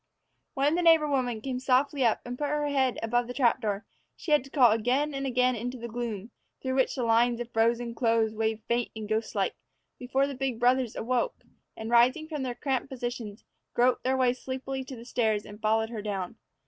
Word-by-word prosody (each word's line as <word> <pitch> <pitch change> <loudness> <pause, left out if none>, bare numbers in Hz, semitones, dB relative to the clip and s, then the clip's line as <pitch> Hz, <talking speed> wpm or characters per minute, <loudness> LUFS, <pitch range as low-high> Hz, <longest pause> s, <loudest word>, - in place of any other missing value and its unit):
WHEN 285 +2 +2
the 350 - +1
neighbor 325 -3 +5
woman 250 -5 -1
came 255 +1 -3
softly 265 +2 +2
up 230 -2 +2
and 245 0 -5
put 290 +3 -2
her 295 0 0
head 265 -3 +1
above 240 +1 +1
the 245 - -6
trap 255 -1 +3
door, 205 -2 -2 0.3
she 315 - -6
had 295 -4 +5
to 275 - -13
call 255 -5 +5
again 250 +7 +1
and 275 0 -2
again 250 0 +2
into 245 +3 -4
the 235 0 -6
gloom, 230 -2 -5 0.3
through 260 -1 -2
which 260 -1 +1
the 255 - -2
lines 235 +1 +3
of 240 0 -6
frozen 235 +1 +1
clothes 225 -2 +1
waved 220 0 -1
faint 235 0 0
and 215 -1 -6
ghost 220 +1 -2
like, - - +1 0.5
before 260 +2 +1
the 280 - -4
big 260 -3 -2
brothers 250 -1 +2
awoke 255 - -1 0.3
and, 220 +1 -5
rising 255 +6 +4
from 305 -3 -4
their 250 -2 -3
cramped 265 -1 -2
positions, 240 -5 -5 0.3
groped 245 +1 +3
their 260 +1 +1
way 250 -1 +3
sleepily 265 +1 -5
to 260 0 -8
the 230 0 -11
stairs 220 -4 0
and 210 +1 -11
followed 220 +1 +1
her 220 -3 -4
down. 195 -4 -4
245 Hz, 210 wpm, -28 LUFS, 225-265 Hz, 0.5 s, neighbor